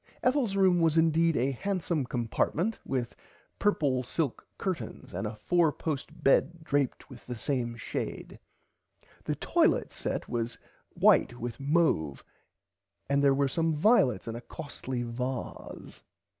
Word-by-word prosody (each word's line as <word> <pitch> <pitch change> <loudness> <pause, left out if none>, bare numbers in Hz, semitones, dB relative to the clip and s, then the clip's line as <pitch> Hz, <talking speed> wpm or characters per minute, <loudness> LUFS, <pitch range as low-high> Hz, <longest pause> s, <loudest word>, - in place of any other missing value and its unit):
Ethels 255 -6 +2
room 190 -3 +4
was 165 -1 +3
indeed 165 0 +3
a 130 +3 +1
handsome 170 -2 -1
compartment 135 - -1
with 125 -3 -3 0.4
purple 145 -11 +2
silk 135 +1 -3
curtains 170 - -4
and - - -2
a - - -6
4 165 +9 +2
post 150 -2 -5
bed 160 +5 +3
draped 140 -4 -1
with 130 -4 -13
the 125 - -4
same 120 -2 -2
shade. - - -5 0.9
The - - -1
toilit - - +2
set - - -3
was 120 0 -2 0.4
white - - +5
and 120 0 -5
mouve 140 - +1 0.9
and 140 0 +3
there 140 -1 +5
were 140 0 +2
some 160 +3 0
violets 150 - +3
in 115 - -4
a 120 - -6
costly 130 -4 -5
varse. 125 +2 -5
140 Hz, 135 wpm, -29 LUFS, 120-165 Hz, 0.9 s, white